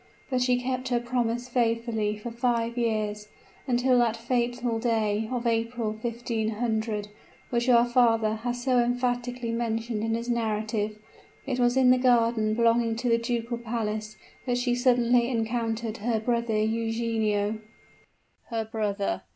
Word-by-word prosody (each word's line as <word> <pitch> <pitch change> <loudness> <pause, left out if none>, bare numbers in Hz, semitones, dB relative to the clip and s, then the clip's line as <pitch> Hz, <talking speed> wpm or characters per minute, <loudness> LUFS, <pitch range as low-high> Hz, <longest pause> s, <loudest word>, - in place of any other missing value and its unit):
But 255 -1 +1
she 250 0 +2
kept 255 0 -2
her 245 -1 +1
promise 240 0 -1
faithfully 230 -3 0
for 230 +3 -6
five 235 -1 0
years; 215 -3 -1 0.4
until 250 0 +3
that 230 -1 +2
fatal 240 0 -1
day 220 -2 0
of 245 -1 -2
April, 230 -1 0
1500, 220 -1 -2 0.4
which 240 +1 +1
our 235 -1 +6
father 230 -3 +3
has 245 +2 -4
so 255 -1 +3
emphatically 245 0 -1
mentioned 230 -1 -2
in 225 0 0
his 235 +1 -4
narrative. 215 -2 -1 0.5
It 255 -2 -2
was 245 +1 +3
in 255 -1 +6
the 255 - +4
garden 230 -3 +3
belonging 230 0 +2
to 240 +2 -1
the 230 0 +3
ducal 235 0 -2
palace 215 -2 -3 0.3
that 245 -1 +1
she 245 0 +1
suddenly 245 -1 +3
encountered 230 -1 -2
her 225 +1 0
brother 235 -1 0
Eugenio 220 -1 0 0.4
" - - -39
"Her 225 -2 -2
brother!" 210 -2 -2
235 Hz, 145 wpm, -27 LUFS, 220-245 Hz, 0.5 s, our